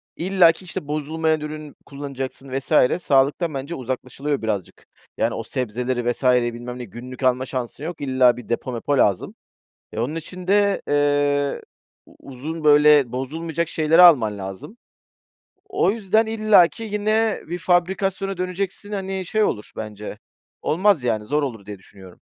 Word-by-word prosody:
illaki, 180 -1 +3
işte, 150 -4 -6
bozulmayan 155 +1 -1
ürün 150 -1 -7
kullanacaksın 140 -1 -7
vs. 150 +4 +2
sağlıktan 145 +4 +2
bence 140 +5 -5
uzaklaşılıyor 130 +2 -4
birazcık. 105 -5 -4 0.3
Yani, - - 0
o - - -4
sebzeleri, 120 0 -2
vs.'yi, 125 -1 +2
bilmem 120 +1 -7
ne, 125 - -6
günlük 125 +5 -10
alma 130 0 +2
şansın 130 +1 -5
yok, 165 0 -6
illa 130 -3 +3
bir 120 - -11
depo, 120 +2 -2
mepo 135 +4 -1
lazım. 100 -7 +1 0.6
E, 110 - -4
onun 130 +7 -2
için 180 +3 -8
de, 200 0 +3
eee, 145 -1 +1 0.4
u - - -20
uzun, 150 +5 -7
böyle, 150 -3 +6
bozulmayacak 160 +6 -3
şeyleri 160 +2 +4
alman 125 -13 +6
lazım. 95 - -8 0.9
O 390 - +2
yüzden, 220 0 +1
illaki 215 -2 +3
yine 215 +1 0
bir 175 +2 -4
fabrikasyona 190 +2 0
döneceksin, 185 +3 -4
hani, 190 -2 -3
şey 215 +4 +1
olur 105 - -2
bence. 105 -1 -7 0.4
Olmaz 185 -3 +2
yani, 110 -3 -1
zor 150 +5 0
olur 115 -7 -5
diye 100 -1 -8
düşünüyorum. 95 -1 -16
145 Hz, 145 wpm, -22 LUFS, 125-180 Hz, 0.9 s, böyle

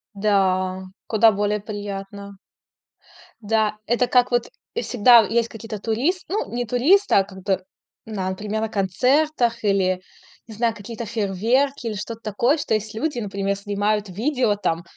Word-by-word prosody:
Да. 190 -2 +1 0.2
Куда 220 0 +5
более 205 +1 0
приятно. 200 -1 -7 1.1
Да, 215 0 +1
это 240 +2 +2
как 250 0 +3
вот 240 -1 +1 0.3
и 470 - 0
всегда 240 0 +6
в - - -5
есть 235 0 +1
какие-то 220 -1 -7
турис 260 - -1
Ну, 415 +3 -2
не 245 0 -1
туристы, 310 - +3
а 195 - +5
как 190 -1 -13
бы, 190 -2 0 0.4
например, 210 +1 -3
на 220 - -1
концертах 240 - +1
или, 185 -2 +1 0.5
не 225 - -10
знаю, 230 +1 0
какие-то 225 +2 -7
фейерверки, 230 +6 0
или 215 - -2
что-то 225 +3 -6
такое. 240 +8 +1
Что 285 - -2
есть 215 +1 -4
люди, 280 +3 -2
например, 200 -1 -2
снимают 205 0 -1
видео, 235 +2 0
там 170 -4 -2
215 Hz, 150 wpm, -22 LUFS, 200-240 Hz, 1.1 s, всегда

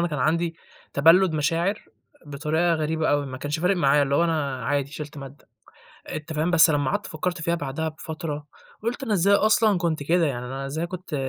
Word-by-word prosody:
أنا 175 - -2
كان 150 - -3
عندي 165 +5 0 0.4
تبلُّد 165 +5 +5
مشاعر، 165 +7 0 0.4
بطريقة 160 +4 0
غريبة 160 0 -1
أوي، 145 -1 +1
ما 130 -1 -7
كانش 145 +3 -3
فارق 180 +3 +2
معايا 145 -3 +4
اللي 140 0 0
هو 170 - +3
أنا 140 -7 -1
عادي 140 +1 -1
شِلت 150 0 -8
مادة، 135 +1 -11 0.6
أنت 155 +1 -6
فاهم؟ 155 +3 0
بس 175 -1 +6
لمّا 145 -3 +1
قعدت - - -2
فكّرت 170 +2 -3
فيها 170 +1 0
بعدها 160 0 -3
بفترة، 155 -1 -6 0.4
قُلت 240 +4 -2
أنا 225 - -1
إزاي 200 +1 +3
أصلًا 215 -1 +3
كنت 165 -4 -1
كده؟! 170 +3 +2
يعني 125 -4 -3
أنا 135 +2 -5
إزاي 160 +5 -3
كنت 180 -2 -6
160 Hz, 195 wpm, -24 LUFS, 145-170 Hz, 0.6 s, بس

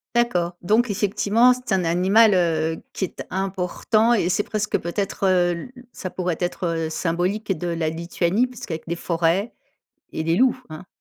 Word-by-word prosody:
D'accord. 180 -8 +1
Donc 220 +5 +2
effectivement, 210 +4 +3
c'est 250 -2 -8
un 185 - +2
animal, 190 +5 +4
heu, 160 -2 0
qui 190 - -1
est - - -9
important 195 +4 +1
et 195 -6 +1
c'est 185 +3 +1
presque 210 0 -1
peut-être, 195 +3 -4
heu, 180 -2 +3
l 175 +10 -7 0.2
ça 185 - -6
pourrait 180 -3 -2
être 170 -2 -2
symbolique 180 +6 -1
de 175 - -4
la 165 -2 -1
Lituanie 170 +6 0
puisqu'avec 205 -10 -7
des 170 - -2
forêts 170 +5 0 0.6
et 160 - -3
des 165 +1 +2
loups, 255 +1 +3
hein. 155 +3 -9
185 Hz, 165 wpm, -23 LUFS, 170-215 Hz, 0.6 s, animal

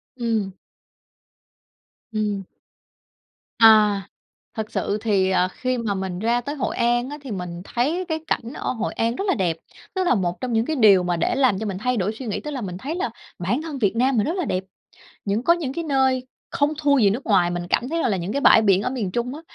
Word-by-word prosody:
Ừm. 225 -6 -1 1.6
Ừm. 210 -3 -1 1.1
À, 215 -3 +6 0.6
thật 215 -1 -4
sự 205 - -1
thì, 200 -4 +2
à, 185 -1 +2
khi 255 +6 -2
mà 220 -3 -1
mình 190 -2 -4
ra 235 +3 +1
tới 285 +5 -5
Hội 265 - -2
An 240 +1 +1
á 295 - -6
thì 270 - -8
mình 180 -3 -5
thấy 300 - -1
cái 320 -1 -1
cảnh 235 -4 -2
ở - - -3
Hội 230 - -3
An 230 +1 -1
rất 390 - -3
là 375 - +3
đẹp, 175 -6 0 0.4
nó 375 - +1
là 350 - +3
một 180 -5 -1
trong 255 -2 -3
những 225 +1 +1
cái 315 - -1
điều 205 -7 +6
mà 175 -1 0
để 165 - 0
làm 255 -8 +3
cho 220 - -3
mình 190 -2 -3
thay 250 +3 0
đổi 205 +1 0
suy 260 - -6
nghĩ. 210 - -2
Tức 300 - -6
là 275 -3 -4
mình 180 -5 -5
thấy 285 +10 -4
là 355 - -2 0.3
bản 230 - -1
thân 310 -4 -6
Việt 215 -3 +1
Nam 255 +2 +2
mình 210 - +2
rất 335 - -1
là 360 - -1
đẹp, 185 -7 -2 0.6
những 205 +3 0
có 335 - +5
những 325 -7 -2
cái 335 +3 -4
nơi 265 -3 +1 0.2
không 290 +1 +1
thua 285 -2 +3
gì 205 -5 +5
nước 240 +7 -3
ngoài, 180 -5 +3
mình 175 0 -3
cảm 250 - +1
thấy 330 +3 -1
rằng - - +1
là 200 - +1
những 180 +3 -4
cái 280 - -1
bãi 220 - +6
biển 195 -2 +3
ở - - -1
miền 230 -8 -3
Trung 240 +6 -2
á 310 - -8
230 Hz, 240 wpm, -23 LUFS, 195-265 Hz, 1.6 s, À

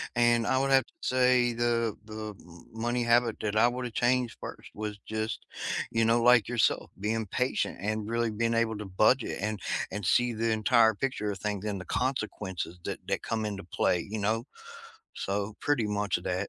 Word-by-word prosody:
and 120 -2 +3
I 130 - +2
would 135 +1 +1
have 135 -1 +5
to - - -27
say 125 -1 +3
the 115 -2 +1
the 110 0 -6
m 85 -1 -15
money 120 +2 -1
habit 120 -1 +3
that 105 -1 -2
I 115 +2 +6
would've 125 -1 -4
changed 125 -1 +1
first - - -8
was 105 -1 -5
just, 110 +1 -3 0.5
you 115 0 +2
know, 115 +1 +3
like 120 -3 +6
yourself, 120 -2 +1
being 110 +2 -1
patient 125 +7 -1
and 110 +1 -2
really 115 -1 0
being 115 +2 0
able 115 -1 +1
to 105 - -5
budget 110 +6 +2
and 105 0 -2 0.3
and 105 0 -4
see 120 +7 +3
the 115 0 0
entire 110 0 +4
picture 105 -3 -2
a - - -4
things 105 +1 -3
and 100 -2 -2
the 95 - -8
consequences 105 -9 -3
that - - -3
that - - -1
come 110 -1 -2
into 100 -2 -4
play, 90 -1 +1
you 110 - -3
know? 110 +3 0 0.7
So, 100 +2 -2
pretty 130 -7 +1
much 105 0 0
of - - -13
that. 90 +2 -1
110 Hz, 195 wpm, -29 LUFS, 105-120 Hz, 0.7 s, I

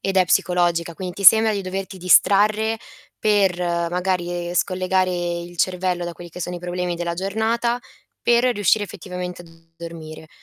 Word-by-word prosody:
ed 195 0 -2
è 185 - +5
psicologica, 175 -2 +1
quindi 180 0 -6
ti 195 +3 -7
sembra 220 +3 +8
di 200 - -2
doverti 190 0 -5
distrarre 210 +4 +3 0.4
per 200 -4 +2
magari, 175 0 -2
e - - -6
scollegare 185 +1 +1
il 175 0 -4
cervello 180 0 0
da 175 - -5
quelli 175 0 -11
che 180 - -10
sono 180 0 -4
i 175 - -7
problemi 180 0 -3
della 170 0 -3
giornata 220 +6 -1 0.4
per 240 0 +3
riuscire 205 +1 +2
effettivamente 180 -2 -7
a - - -16 0.3
dormire. 160 -2 -9
180 Hz, 160 wpm, -21 LUFS, 175-195 Hz, 0.4 s, sembra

